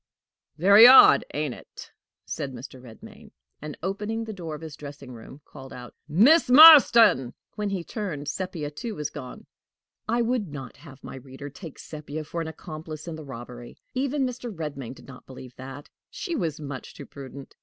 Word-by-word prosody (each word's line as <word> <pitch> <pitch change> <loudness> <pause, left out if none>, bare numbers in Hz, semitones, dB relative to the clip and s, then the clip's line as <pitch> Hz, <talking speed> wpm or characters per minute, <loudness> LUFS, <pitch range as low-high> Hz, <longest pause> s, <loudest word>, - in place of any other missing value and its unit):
"Very 200 +7 +8
odd 260 +1 +8
ain't 150 -3 -3
it?" - - -13 0.3
said 135 -2 -5
Mr. 130 +1 -11
Redmain, 115 -3 -14 0.3
and, 150 0 -8
opening 210 +4 -3
the 220 -1 -7
door 165 -5 -7
of 150 - -11
his 160 -3 -9
dressing 140 -3 -11
room, 125 +4 -13
called 135 -2 -13
out: 125 -1 -11
"Miss 240 - +4
Marston!" 250 - +7 0.2
When 210 -1 -4
he 190 -3 -4
turned, 170 -9 -6
Sepia 165 -3 -5
too 225 +8 -7
was 150 -1 -5
gone. 130 -4 -10 0.6
I 235 +1 +1
would 230 -3 -1
not 135 -5 -10
have 140 -5 -16
my - - -9
reader 135 +2 -11
take 140 +2 -11
Sepia 155 0 -8
for 170 +2 -5
an 165 - -5
accomplice 155 0 -9
in 170 - -5
the 155 - -10
robbery. 120 -2 -11 0.2
Even 275 +1 -1
Mr. 245 -1 -6
Redmain 145 - -7
did - - -17
not 130 -2 -14
believe 130 -1 -12
that: 135 +2 -10 0.2
she 360 -5 -5
was 160 - -3
much 140 -3 -8
too - - -10
prudent! 140 0 -12
150 Hz, 175 wpm, -25 LUFS, 135-205 Hz, 0.6 s, Very